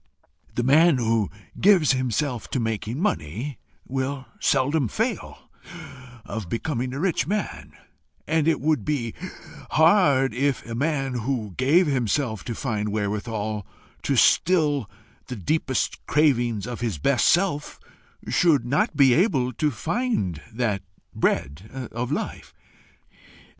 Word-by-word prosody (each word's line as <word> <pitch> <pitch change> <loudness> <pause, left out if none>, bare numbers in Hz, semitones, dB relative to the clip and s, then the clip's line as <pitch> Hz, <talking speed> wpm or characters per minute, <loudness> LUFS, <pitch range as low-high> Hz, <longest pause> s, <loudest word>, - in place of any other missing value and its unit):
The 120 - 0
man 155 +4 +5
who 115 -3 +1 0.3
gives 185 -6 +5
himself 130 -1 -1
to 130 - -1
making 115 +2 -2
money, 130 - -2 0.3
will 135 +1 -3
seldom 140 0 +2
fail - - -4 0.7
of 110 -6 -5
becoming 125 - -2
a 135 - -5
rich 170 -6 0
man; 205 +2 -3 0.5
and 160 -1 +1
it 165 - +2
would 155 0 +1
be 130 -7 -2 0.6
hard 150 - +4
if 135 +2 0
a 115 - -6
man 135 +1 -1
who 120 -4 -2
gave 155 +8 +4
himself 125 - -1
to 115 - -4
find 105 -5 -2
wherewithal 105 0 -3 0.3
to - - 0
still 150 - +3 0.4
the 125 - -5
deepest 130 - -1
cravings 120 -8 +2
of 120 -1 -5
his 115 -8 -2
best 130 - +2
self, 175 -5 +1 0.5
should 150 -9 +3
not 140 +5 +1
be 135 -3 +6
able 135 - +2
to 150 +6 +1
find 150 - -2
that 110 -4 -1 0.3
bread 105 - -2
of 120 +3 -3
life. - - -4
130 Hz, 125 wpm, -24 LUFS, 115-150 Hz, 0.7 s, be